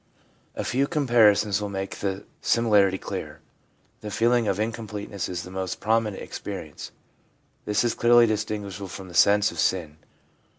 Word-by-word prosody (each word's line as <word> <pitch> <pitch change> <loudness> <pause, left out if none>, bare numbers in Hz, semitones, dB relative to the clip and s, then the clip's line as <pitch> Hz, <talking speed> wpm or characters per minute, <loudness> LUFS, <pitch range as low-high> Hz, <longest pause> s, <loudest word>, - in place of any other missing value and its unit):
A - - -3
few 135 +3 0
comparisons 110 - +3
will 105 - -3
make 95 0 -5
the 100 0 -3 0.2
similarity 105 -5 +3
clear. - - -6 0.6
The 105 - -7
feeling 115 +2 +2
of 100 0 0
incompleteness 105 -3 -4
is 90 -1 -4
the 90 - -10
most 95 -1 -4
prominent 110 -2 0
experi - - -7
ence; - - -9 0.7
this 105 +2 +1
is 120 - +1
clearly 120 0 +5
distinguishable 105 -3 -3
from 95 0 -9
the - - -12
sense 105 +3 +4
of - - -9
sin. 80 -5 0
105 Hz, 155 wpm, -25 LUFS, 95-115 Hz, 0.7 s, clearly